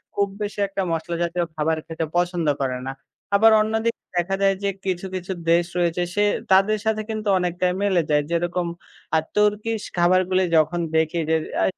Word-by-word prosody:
খুব 200 0 +2
বেশি 205 0 -4
একটা 195 0 -3
মশলা 165 +1 -2
জাতীয় 170 0 -1
খাবার 160 +1 0
খেতে 160 0 -3
পছন্দ 175 -2 0
করে 130 -1 -1
না। - - -2 0.4
আবার 220 +2 +6
অন্যদি 220 +1 0 0.3
দেখা 185 +3 +1
যায় 195 -1 +4
যে 200 - +2 0.2
কিছু, 185 0 -2
কিছু 185 +1 -5 0.2
দেশ 170 0 +4
রয়েছে 175 0 +1
সে 205 - +3 0.3
তাদের 195 +3 +5
সাথে 220 0 +1
কিন্তু 215 -1 -4
অনেকটাই 180 0 0
মিলে 190 -4 +3
যায়। 150 -1 +3
যেরকম 175 +1 0 0.5
আ - - +6 0.2
তুর্কিশ 210 +1 +1 0.2
খাবারগুলি 185 +1 +3
যখন 165 +3 +2 0.2
দেখি 160 +2 +1
যে 160 - +3 0.3
আ - - +3
180 Hz, 175 wpm, -23 LUFS, 170-200 Hz, 0.5 s, আবার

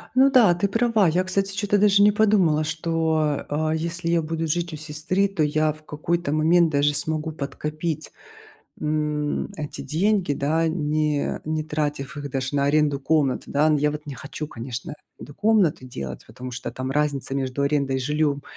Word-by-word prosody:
Ну 265 +1 +6
да, 240 -9 +6
ты 175 +4 0
права. 225 -1 +2
Я, 175 +3 +2
кстати, 195 +1 -1
чё-то 205 0 +1
даже 200 0 +5
не 210 - +6
подумала, 195 -8 +3
что, 160 -1 0
а, 155 +1 0
если 165 +2 -2
я 170 0 +3
буду 165 +1 -3
жить 170 +2 -1
у - - -5
сестры, 155 +6 -1
то 195 -5 -3
я 155 +1 +2
в 155 0 -14
какой-то 160 +1 -2
момент 165 +2 +4
даже 145 0 +2
смогу 155 +2 0
подкопить, 150 +2 -4 0.7
м, 150 -1 -1
эти 150 -1 -6
деньги, 185 0 +1
да, 160 +4 +1
не 150 -2 -1
не 155 0 -1
тратив 150 -1 -3
их 145 0 -5
даже 130 0 -3
на 140 -1 +2
аренду 145 -1 +2
комнаты, 145 -2 0
да. 155 +2 +3
Я 150 +1 +2
вот 150 0 -7
не 145 -2 -7
хочу, 145 +3 -6
конечно, 125 0 -6 0.3
эту 145 - -10
комнату 200 -8 +2
делать, 70 - -7
потому 125 0 -8
что 125 +1 -5
там 130 +1 -4
разница 145 -2 -1
между 135 0 -2
арендой 140 -1 +1
и 130 - -1
жильём, 145 +1 0
155 Hz, 180 wpm, -24 LUFS, 145-170 Hz, 0.7 s, Ну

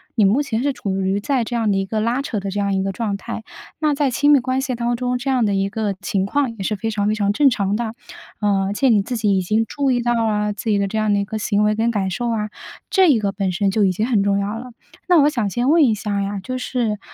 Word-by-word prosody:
你 215 - +4
目 220 +9 +3
前 240 -5 -2
是 280 +1 0
处 195 -5 -3
于 195 +1 0
在 255 -1 0
这 240 - -4
样 225 -3 +1
的 195 - +1
一 195 - 0
个 215 +2 -2
拉 240 +4 0
扯 220 -7 -3
的 195 0 -4
这 205 - -2
样 200 -1 0
一 190 - 0
个 195 - -1
状 205 0 -2
态。 225 +2 -6 0.4
那 300 -2 +1
在 280 -2 +1
亲 290 +4 +2
密 275 - +5
关 255 +1 -1
系 265 -2 -2
当 240 0 -1
中， 250 0 -1
这 270 +2 -4
样 250 -4 +2
的 200 -1 +1
一 195 0 0
个 210 -1 -2
情 190 -1 -1
况 260 +2 0
也 195 - -5
是 210 - -1
非 225 +3 -3
常 205 -1 -1
非 215 - +1
常 205 -1 +1
正 275 +6 +4
常 200 -2 0
的。 230 -2 -3 0.5
呃， 200 -2 +2
而 200 - -2
且 265 +5 +2
你 215 -4 +4
自 245 +4 -4
己 205 -3 +1
已 - - +1
经 215 +5 +1
注 280 +2 -1
意 245 -2 +2
到 240 0 +1
了 210 -1 0
自 205 +2 -5
己 205 - +3
的 200 - +1
这 220 - -3
样 215 -1 +1
的 - - +2
一 200 - 0
个 215 +2 -5
行 210 0 +1
为 210 0 +2
跟 230 +2 +1
感 195 -3 -1
受 240 +5 -2
啊， 215 -2 -1 0.4
这 375 -4 +4
一 250 - +4
个 200 -1 0
本 195 -2 -2
身 195 +1 +1
就 210 -1 +2
已 185 - +2
经 215 +5 -1
很 225 -5 +2
重 200 0 +1
要 205 +3 -3
了。 250 0 -9 0.4
那 350 -5 +5
我 290 - +5
想 235 -8 -1
先 240 +6 0
问 325 +1 +5
一 225 -4 +2
下 205 -1 -2
呀， 200 0 -3
就 255 0 -4
是， 235 -5 -2
215 Hz, 325 characters per minute, -20 LUFS, 200-245 Hz, 0.5 s, 密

